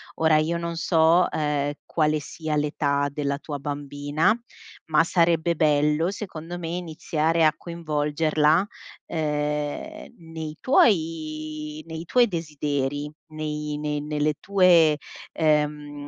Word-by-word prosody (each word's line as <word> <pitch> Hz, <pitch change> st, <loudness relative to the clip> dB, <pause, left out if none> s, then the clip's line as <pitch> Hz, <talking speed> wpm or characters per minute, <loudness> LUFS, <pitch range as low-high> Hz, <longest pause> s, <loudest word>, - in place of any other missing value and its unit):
Ora 160 Hz, -1 st, +4 dB
io 160 Hz, +2 st, +1 dB
non 170 Hz, 0 st, -4 dB
so, 165 Hz, +1 st, +4 dB
ehm, 145 Hz, -1 st, -1 dB
quale 155 Hz, -1 st, +1 dB
sia 155 Hz, +1 st, -4 dB
l'età 145 Hz, -1 st, 0 dB
della 140 Hz, -1 st, -2 dB
tua 145 Hz, -1 st, -5 dB
bambina, 145 Hz, +5 st, 0 dB, 0.5 s
ma 160 Hz, 0 st, +3 dB
sarebbe 170 Hz, -1 st, +2 dB
bello 150 Hz, +3 st, +2 dB
secondo 175 Hz, -4 st, -7 dB
me 165 Hz, -2 st, -5 dB
iniziare 165 Hz, -1 st, -1 dB
a 155 Hz, -1 st, +5 dB
coinvolgerla, 155 Hz, 0 st, +1 dB, 0.4 s
ehm, 150 Hz, -, -3 dB
nei 160 Hz, -2 st, -7 dB
tuoi 155 Hz, -, +1 dB
nei 160 Hz, +1 st, -6 dB
tuoi 245 Hz, +6 st, +4 dB
desideri, 145 Hz, -4 st, -2 dB, 0.2 s
nei 150 Hz, -1 st, -4 dB
nei 150 Hz, -1 st, -2 dB
nelle 150 Hz, 0 st, -1 dB
tue 175 Hz, -6 st, +5 dB, 0.4 s
ehm, 150 Hz, -2 st, 0 dB
155 Hz, 110 wpm, -25 LUFS, 150-165 Hz, 0.5 s, a